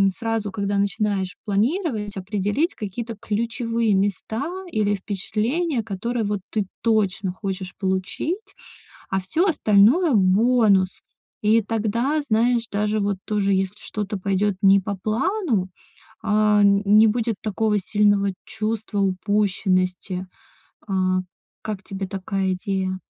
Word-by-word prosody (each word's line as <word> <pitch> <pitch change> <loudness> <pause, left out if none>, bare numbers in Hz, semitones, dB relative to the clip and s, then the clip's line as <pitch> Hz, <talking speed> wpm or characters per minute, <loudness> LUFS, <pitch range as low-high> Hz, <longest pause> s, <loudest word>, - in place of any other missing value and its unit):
сразу, 225 -3 -2
когда 200 +1 -1
начинаешь 200 -2 0
планировать, 215 - 0
определить 205 - -1
какие-то 225 +3 -5
ключевые 230 0 0
места 205 +5 -1 0.3
или 210 -1 +1
впечатления, 225 - -1
которые 225 +3 -2
вот 205 -1 -2
ты 210 -3 -1
точно 215 -3 +1
хочешь 190 -2 -5
получить. 190 - -2 0.6
А 190 0 0
всё 315 - +1
остальное- 275 - +4
бонус. 200 -1 +3 0.4
И 220 +2 +4
тогда, 225 +7 0
знаешь, 235 -2 +1
даже, 210 +1 0
вот 200 -1 0
тоже, 200 -2 +1
если 190 +1 0
что-то 210 -1 -4
пойдет 195 +1 0
не 195 -1 +6
по 200 +1 -4
плану, 230 - 0 0.5
а, 210 -1 +3
н 200 0 +4
не 210 +2 +6
будет 230 +1 0
такого 215 0 +1
сильного 205 0 +2
чувства 220 -1 -3
упущенности. 185 -1 0 0.6
А. 185 -2 +1 0.4
Как 215 -3 -4
тебе 195 -1 -5
такая 195 0 -2
идея? 185 0 -2
205 Hz, 115 wpm, -23 LUFS, 195-225 Hz, 0.6 s, не